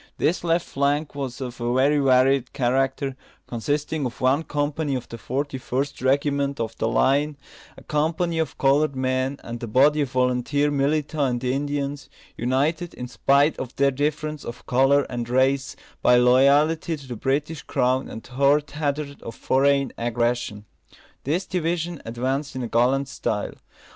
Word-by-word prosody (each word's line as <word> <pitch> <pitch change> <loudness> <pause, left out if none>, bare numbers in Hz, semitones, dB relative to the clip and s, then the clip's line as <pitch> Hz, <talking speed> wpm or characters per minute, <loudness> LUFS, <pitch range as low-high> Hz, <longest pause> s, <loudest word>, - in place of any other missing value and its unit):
This 170 - 0
left 170 0 +1
flank 145 +2 0
was 135 -3 -5
of 125 -2 -6
a 120 +1 0
very 140 +3 +3
varied 130 -1 +3
character, 135 +1 0 0.3
consisting 145 +5 -2
of 120 - -10
one 130 +4 +3
company 145 -1 -2
of 125 -2 -5
the 115 - -9
Forty 135 +2 -3
first 135 +3 -3
Regiment 140 +1 +1
of 115 -1 -3
the - - +1
line, 140 +5 +2 0.4
a - - -13
company 160 +3 0
of 160 - -2
coloured 140 +1 +2
men, 130 +1 -1
and 120 0 -7
a 120 - -4
body 145 +7 +4
of 140 - -1
volunteer 130 +3 +1
militia 145 +2 0
and 125 -1 -1
Indians, 140 +2 -2 0.3
united, 145 +8 -1
in 125 - -6
spite 140 +4 +3
of 130 -1 -6
their 140 0 +3
difference 150 +2 -2
of 120 +1 -8
colour 135 +3 +3
and 120 -2 -5
race, 130 +2 +1 0.3
by 125 - +5
loyalty 140 +6 +4
to 140 -2 -13
the 125 - -5
British 145 +6 -1
crown 130 0 0
and 110 - -8
heart 140 +3 +2
hatred 145 -1 -3
of 115 - -8
foreign 140 0 +2
aggression. 120 -3 -1 0.6
This 170 +7 0
division 170 -2 -2
advanced 130 +5 -2
in 125 -2 -3
gallant 130 +4 +2
style. 105 -6 -3
140 Hz, 155 wpm, -24 LUFS, 125-145 Hz, 0.6 s, by